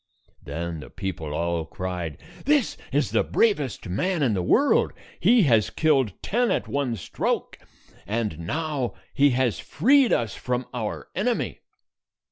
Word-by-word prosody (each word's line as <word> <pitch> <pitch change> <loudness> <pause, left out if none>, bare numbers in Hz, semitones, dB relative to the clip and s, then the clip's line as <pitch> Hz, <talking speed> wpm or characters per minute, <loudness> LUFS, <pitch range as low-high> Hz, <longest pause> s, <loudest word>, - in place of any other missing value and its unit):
Then 80 +3 -4
the - - -10
people 95 -6 -5
all 85 0 0
cried, 90 -3 -5 0.3
"This 290 -3 +3 0.2
is 145 +1 +1
the - - +3
bravest 150 - +1
man 160 - 0
in 120 -5 +2
the 95 - 0
world. 270 - +3 0.3
He 235 -3 +5
has 115 -8 +4
killed 140 -8 +2
ten 240 +3 +1
at - - 0
one 140 -4 -1
stroke, 95 - -2 0.5
and 105 -7 -2
now 140 - -2 0.2
he 145 +1 +5
has 125 -5 +1
freed 260 - +3
us 115 -4 +1
from 125 0 -2
our 110 -4 -4
enemy." - - -1
125 Hz, 140 wpm, -25 LUFS, -, 0.5 s, He